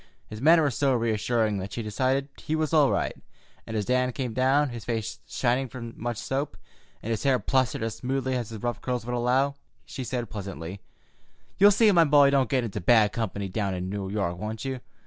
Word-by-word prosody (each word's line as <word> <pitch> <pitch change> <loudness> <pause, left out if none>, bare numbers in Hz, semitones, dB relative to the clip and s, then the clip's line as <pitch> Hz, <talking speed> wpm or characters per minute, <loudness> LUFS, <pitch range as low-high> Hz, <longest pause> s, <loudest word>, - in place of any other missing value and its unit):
His 105 +1 -9
manner 160 +3 +6
was 140 -6 0
so 135 -2 +2
reassuring 110 -2 0
that 95 +1 -6
she 115 - -3
decided 130 +6 0
he 155 - -2
was 155 0 -1
all 150 -4 +5
right, - - -1 0.5
and 110 - -3
as 105 - -1
Dan 125 +1 +1
came 125 -3 -3
down, 135 +4 +3
his 120 -2 -7
face 115 -1 -3
shining 125 +1 0
from 115 -2 -8
much 120 0 -4
soap, 135 -6 -3 0.5
and 115 - -3
his 110 - -1
hair 135 -2 +3
plastered 125 0 0
as 115 -1 -3
smoothly 130 0 -1
as 120 -4 -3
his 110 -1 -8
rough 120 -3 -2
curls 125 -2 -2
would 125 - -3
allow, 125 +3 +2 0.3
she 130 - -6
said 120 -1 -3
pleasantly: 95 -3 -7 0.8
"You'll 200 +1 +8
see 210 +1 +5
my 170 -3 +5
boy 145 -2 +6
don't 135 -3 +2
get 130 -3 +1
into 110 -6 -4
bad 110 +2 +5
company 100 -4 -3
down 95 0 -2
in 90 +1 -4
New 100 -2 -4
York, 95 -4 -2
won't 110 +4 -5
you? 130 -1 -3
120 Hz, 210 wpm, -26 LUFS, 110-135 Hz, 0.8 s, You'll